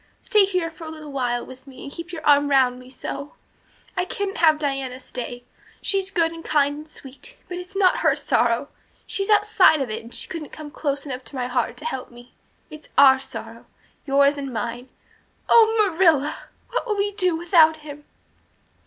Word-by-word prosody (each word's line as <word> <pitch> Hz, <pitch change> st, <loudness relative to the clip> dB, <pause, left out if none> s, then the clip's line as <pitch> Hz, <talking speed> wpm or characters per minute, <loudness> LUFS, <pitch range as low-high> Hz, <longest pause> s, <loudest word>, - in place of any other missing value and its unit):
Stay 425 Hz, -4 st, +5 dB
here 365 Hz, -4 st, -1 dB
for 325 Hz, 0 st, -11 dB
a -, -, -6 dB
little 310 Hz, -2 st, -9 dB
while 245 Hz, -3 st, -1 dB
with 260 Hz, +2 st, -13 dB
me 265 Hz, -, -12 dB
and 280 Hz, -, -8 dB
keep 335 Hz, +3 st, -8 dB
your 320 Hz, -3 st, -7 dB
arm 285 Hz, 0 st, +5 dB
round 255 Hz, -3 st, +3 dB
me 255 Hz, 0 st, -14 dB
so. 280 Hz, +2 st, -7 dB, 0.6 s
I 360 Hz, -, +1 dB
couldn't 395 Hz, +1 st, -4 dB
have 315 Hz, -2 st, +5 dB
Diana 270 Hz, -3 st, -3 dB
stay, 245 Hz, -1 st, -7 dB, 0.4 s
she's 390 Hz, -1 st, 0 dB
good 330 Hz, -4 st, +1 dB
and 330 Hz, 0 st, -9 dB
kind 290 Hz, -1 st, +2 dB
and 305 Hz, +1 st, -10 dB
sweet 285 Hz, -, -12 dB
but 360 Hz, 0 st, -5 dB
it's 365 Hz, +2 st, -10 dB
not 380 Hz, -2 st, +4 dB
her 315 Hz, -4 st, +3 dB
sorrow 245 Hz, -2 st, +1 dB, 0.4 s
she's 395 Hz, +1 st, -2 dB
outside 410 Hz, -6 st, +5 dB
of 265 Hz, -5 st, -2 dB
it 215 Hz, -, -4 dB
and 230 Hz, -, -13 dB
she -, -, -6 dB
couldn't 315 Hz, -3 st, -6 dB
come 305 Hz, -1 st, -10 dB
close 285 Hz, -2 st, -3 dB
enough 260 Hz, -2 st, -6 dB
to -, -, -8 dB
my 250 Hz, -1 st, -2 dB
heart 250 Hz, +1 st, -1 dB
to 305 Hz, -, -10 dB
help 265 Hz, -5 st, -4 dB
me. 240 Hz, 0 st, -16 dB, 0.4 s
It's 305 Hz, 0 st, -11 dB
our 265 Hz, -1 st, +7 dB
sorrow 230 Hz, -3 st, -8 dB, 0.4 s
yours 280 Hz, +1 st, +3 dB
and 275 Hz, -1 st, -5 dB
mine. 240 Hz, +2 st, -5 dB, 0.6 s
Oh, 445 Hz, -1 st, +6 dB
Marilla, 330 Hz, -7 st, +2 dB, 0.3 s
what -, -, -2 dB
will 420 Hz, -2 st, -1 dB
we 405 Hz, +1 st, 0 dB
do 365 Hz, -4 st, +1 dB
without 325 Hz, -2 st, +4 dB
him?" 295 Hz, 0 st, -10 dB
295 Hz, 195 wpm, -23 LUFS, 265-355 Hz, 0.6 s, our